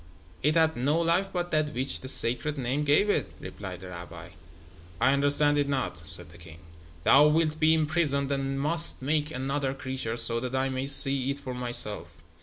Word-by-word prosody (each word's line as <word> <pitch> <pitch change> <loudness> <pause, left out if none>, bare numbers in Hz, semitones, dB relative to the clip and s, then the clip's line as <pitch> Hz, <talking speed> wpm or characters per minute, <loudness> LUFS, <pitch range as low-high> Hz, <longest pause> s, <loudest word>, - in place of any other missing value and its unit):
"It 150 +3 0
had 160 -1 +2
no 145 +7 0
life 170 +4 0
but 175 -1 -4
that 155 -1 -1
which 130 +2 -2
the 130 - -10
Sacred 130 +4 -1
Name 135 +3 -2
gave 150 +8 +2
it," 205 - -1
replied 95 -3 -9
the 95 - -10
rabbi. 90 -1 -10 0.7
"I 135 - +3
understand 145 +1 +1
it 140 -1 -1
not," 90 -11 -4
said 85 -4 0
the 85 - -16
king. 80 -2 -13 0.5
"Thou 145 - +5
wilt 155 0 0
be 160 +1 +3
imprisoned 150 -3 0
and 135 0 -3
must 165 -1 +3
make 150 +2 -1
another 135 0 -3
creature, 130 -4 -5
so 115 0 +2
that 125 +2 -5
I 135 0 -1
may 130 +1 -4
see 135 -1 +5
it 140 - -3
for 130 -3 -8
myself. 120 -4 +1
140 Hz, 190 wpm, -26 LUFS, 125-150 Hz, 0.7 s, Thou